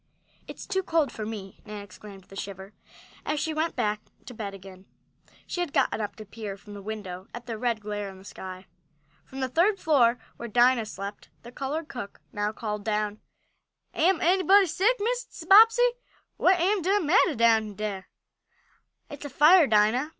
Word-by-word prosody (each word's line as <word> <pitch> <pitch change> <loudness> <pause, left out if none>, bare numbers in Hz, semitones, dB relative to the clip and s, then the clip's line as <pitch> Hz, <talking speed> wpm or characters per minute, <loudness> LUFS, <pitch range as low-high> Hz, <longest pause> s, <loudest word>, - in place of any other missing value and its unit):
"It's - - -9
too 380 -1 -1
cold 325 -6 +1
for 215 -1 -6
me!" 200 -4 -8
Nan 210 -1 -8
exclaimed 200 0 -13
with - - -28
a - - -10
shiver, 195 0 -7 0.5
as 300 0 -1
she 315 - -2
went 315 +2 -1
back 210 0 -1 0.3
in 245 - -9
bed 200 -3 -5
again. 190 0 -13 0.6
She - - -5
had 345 -5 -3
gotten - - +1
up 205 - -4
to 215 - -10
peer 205 -1 -7
from 205 +1 -13
the 200 - -8
window 195 -3 -7
at 240 0 -8
the 235 -2 -4
red 230 -1 -1
glare 205 -1 -4
in 190 - -12
the 190 - -16
sky. 185 -1 -9 0.6
From 265 0 -8
the 260 - 0
third 350 - +2
floor, 250 -9 +3 0.2
where 235 - -6
Dinah 240 0 +4
slept, 200 0 -7
the 240 - -11
colored 290 +5 -4
cook 235 -8 -8
now 205 0 -1
called 210 -2 -5
down: 210 -1 -2 0.7
"Am 345 +1 +2
anybody 380 +3 +5
sick, 410 +8 +2
Mrs. 465 -6 -3
Bobbsey? 455 +5 +7 0.5
What 365 0 +3
am 385 +3 +2
de 390 +4 +2
mattah 345 -1 +3
down 220 -2 +3
dere?" 200 -3 -4 1.0
"It's 290 0 -9
a - - -5
fire, 305 +4 +6
Dinah!" 220 +6 +3
230 Hz, 180 wpm, -27 LUFS, 205-320 Hz, 1.0 s, Bobbsey